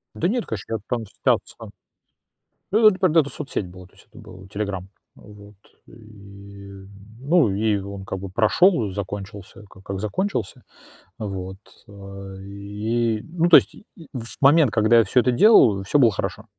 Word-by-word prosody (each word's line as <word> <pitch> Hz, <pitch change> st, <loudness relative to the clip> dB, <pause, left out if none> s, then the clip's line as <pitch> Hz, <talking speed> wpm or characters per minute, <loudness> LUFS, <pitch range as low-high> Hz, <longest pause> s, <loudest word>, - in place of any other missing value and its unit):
Да 175 Hz, -, 0 dB
нет, 235 Hz, +3 st, -1 dB
конечно, 110 Hz, +1 st, -6 dB
я 110 Hz, -, -2 dB
там 120 Hz, -3 st, -2 dB
статься. 100 Hz, -, -3 dB, 1.0 s
Ну 220 Hz, +3 st, +2 dB
да, 215 Hz, -, +9 dB
например, 185 Hz, -4 st, +2 dB
это 140 Hz, -3 st, 0 dB
соцсеть 140 Hz, -12 st, -5 dB
была, 90 Hz, +1 st, -13 dB
то 95 Hz, -, -23 dB
есть -, -, -21 dB
это -, -, -19 dB
был 95 Hz, +1 st, -13 dB
"Телеграм". 100 Hz, -2 st, -5 dB, 0.3 s
Вот, 105 Hz, 0 st, -16 dB, 0.3 s
и, 100 Hz, -2 st, -14 dB, 0.3 s
ну, 145 Hz, -, +2 dB
и 105 Hz, 0 st, 0 dB
он 100 Hz, 0 st, -8 dB
как 95 Hz, -, -5 dB
бы 95 Hz, 0 st, -7 dB
прошел, 115 Hz, -, +2 dB
э, -, -, -8 dB
закончился, 100 Hz, +1 st, -8 dB
ка 95 Hz, -, -17 dB
как 95 Hz, -1 st, -6 dB
закончился. 110 Hz, -, -3 dB, 0.6 s
Вот, 95 Hz, -2 st, -6 dB, 0.3 s
а, 100 Hz, -1 st, -10 dB
и, 105 Hz, +3 st, -3 dB
ну 170 Hz, +4 st, -1 dB
то 175 Hz, -, +9 dB
есть, -, -, +3 dB
и -, -, -17 dB
и 165 Hz, -6 st, -14 dB
в 115 Hz, -3 st, -7 dB
момент, 145 Hz, -2 st, +5 dB
когда 110 Hz, +1 st, +3 dB
я 115 Hz, -, +5 dB
всё 125 Hz, -, +2 dB
это 125 Hz, -, +1 dB
делаю, 120 Hz, -, +5 dB
всё 145 Hz, -, +1 dB
было 120 Hz, -5 st, +5 dB
хорошо. 100 Hz, +2 st, -5 dB
105 Hz, 175 wpm, -22 LUFS, 100-125 Hz, 1.0 s, да